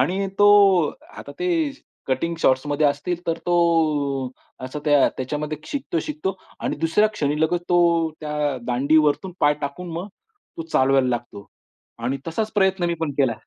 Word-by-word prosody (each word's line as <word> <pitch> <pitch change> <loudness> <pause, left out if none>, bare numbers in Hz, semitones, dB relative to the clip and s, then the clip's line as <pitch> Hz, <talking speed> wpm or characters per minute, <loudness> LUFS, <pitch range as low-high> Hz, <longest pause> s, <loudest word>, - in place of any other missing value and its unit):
आणि 190 +8 +1
तो 205 0 +7 0.7
आता - - -9
ते 360 - 0 0.6
कटींग 150 +6 -1
शॉर्ट्समध्ये 145 +3 +2
असतील 145 +5 -1
तर 165 0 -1
तो 175 - +2 1.1
असा 130 +3 -6
त्या 145 -2 +4
त्याच्यामध्ये 150 +3 -4
शिकतो-शिकतो. 300 - -3 0.3
आणि - - -2
दुसऱ्या 165 +7 +3
क्षणी 150 -7 -2
लगत 175 +2 +1
तो 170 -2 +3
त्या 150 -2 -2
दांडीवरतून 150 +7 +2
पाय 145 0 +4
टाकून 165 +5 -5
मग 175 +5 -5 0.5
तो - - -2
चालवायला 135 -1 +3
लागतो 120 -4 -4 0.5
आणि 125 +4 -2
तसाच 215 +7 -2
प्रयत्न 190 -2 +2
मी 170 - 0
पण 160 -3 -1
केला. 130 -4 +3
155 Hz, 145 wpm, -22 LUFS, 140-180 Hz, 1.1 s, तो